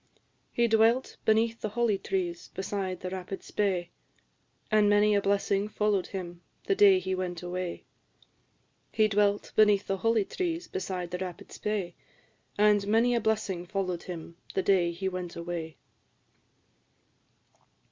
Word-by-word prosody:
"He 235 0 +2
dwelt 225 +3 +3
beneath 225 +1 +2
the 215 - -2
holly 220 -2 +1
trees, 180 -2 -3
beside 190 -1 -3
the 185 - -4
rapid 190 +1 -6
Spey, 185 -4 -1 0.8
And 210 -1 +4
many 205 +1 +4
a 200 - +3
blessing 200 0 +1
follow'd 210 -3 0
him, 175 -3 -7 0.2
the 395 - +1
day 395 -1 +6
he 190 - -2
went 180 -2 -3
away. 180 0 -4 1.1
He 215 -1 +3
dwelt 205 0 +1
beneath 210 -2 +5
the 195 - -1
holly 225 0 +2
trees, 345 - -3
beside 185 -2 -4
the 180 - -3
rapid 185 -2 -7
Spey, 200 -5 -3 0.6
And 205 -1 +4
many 230 +3 +3
a 235 - +1
blessing 210 -5 -1
follow'd 185 -3 -2
him, 170 -2 -8 0.2
the 190 - +1
day 180 -3 +3
he 185 +3 -4
went 180 -2 -4
away." 170 -3 -5
195 Hz, 140 wpm, -29 LUFS, 180-215 Hz, 1.1 s, day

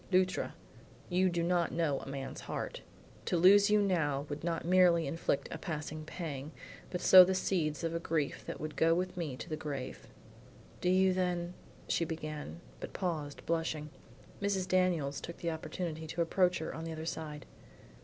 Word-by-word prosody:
"Luttra, 185 0 +2 0.5
you 185 +1 +3
do 170 -1 0
not 175 0 +1
know 160 -5 0
a - - -10
man's 135 -1 -5
heart. - - -5 0.4
To 175 - +1
lose 200 +4 +7
you 210 0 +5
now 150 -7 +1
would 145 +1 -5
not 165 -1 -1
merely 175 -2 +5
inflict 145 -1 -1
a 160 - -5
passing 155 -2 -5
pang, 155 -3 -5 0.4
but 180 - -3
sow 185 -1 +10
the 190 +1 +1
seeds 160 -6 0
of 165 0 -1
a 165 - -1
grief 160 -3 -1
that - - -5
would 155 0 -5
go 165 +1 +4
with 180 +1 -2
me 155 -7 -3
to - - -7
the 155 - -2
grave." 140 -4 -6 0.7
"Do 180 - +1
you 185 0 +4
then" 180 -1 -1 0.3
she - - +1
began, 155 - -5 0.2
but - - -7
paused 155 -6 -3
blushing. 160 -2 -1 0.5
Mrs. 195 -2 0
Daniels 170 -7 +1
took 170 - -7
the 170 - -2
opportunity 160 0 -4
to 165 +2 0
approach 180 +1 +2
her 160 - -4
on 165 - -6
the 165 - -4
other 160 0 -6
side. 155 -3 -5
165 Hz, 180 wpm, -33 LUFS, 155-180 Hz, 0.7 s, sow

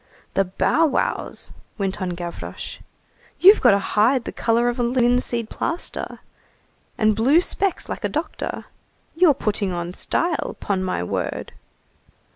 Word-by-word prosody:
"The 195 - +2
bow 195 - +2
wows!" 275 - -2 0.3
went 195 -1 -2
on 180 -2 -2
Gavroche, 175 -1 -6 0.6
"you've 395 +4 +8
got 200 - +6
a 200 - -2
hide 240 +4 +3
the - - -5
color 235 +1 +1
of 240 +1 -1
a - - +2
linseed 240 -1 +1
plaster, 335 +9 -4 0.8
and 215 -2 +3
blue 260 +9 +4
specs 385 +1 -1
like - - -5
a - - 0
doctor. - - -4 0.5
You're 330 -4 +5
putting 205 -4 -1
on 175 0 -4
style, 335 - -1
'pon 190 -2 -1
my 180 - -1
word!" 90 - -3
230 Hz, 140 wpm, -22 LUFS, 195-270 Hz, 0.8 s, you've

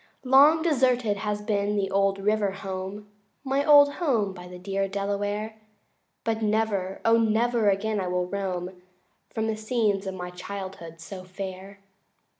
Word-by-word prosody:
IV - - -6
Long 295 +4 +7
deserted 250 -9 +2
has 210 0 -3
been 205 -1 0
the 195 -1 -1
old 195 0 +2
river 210 +1 +1
home, 195 +1 -6 0.4
My 270 +1 0
old 285 -1 +7
home 225 - +1
by 180 -1 -10
the 180 0 -10
dear 195 +2 -2
Delaware, 205 +2 -3 0.6
But 225 0 -1
never, 210 -3 0
O 230 0 +5
never 225 0 +2
again 205 +2 0
will 180 0 +1
I - - -11
roam 185 -2 -4 0.5
From 220 - -2
the 220 -1 -1
scenes 215 -3 0
of 190 - -4
my 180 -1 -6
childhood 180 -3 -8
so 185 +2 -8
fair. 190 +1 -8
205 Hz, 155 wpm, -26 LUFS, 190-220 Hz, 0.6 s, Long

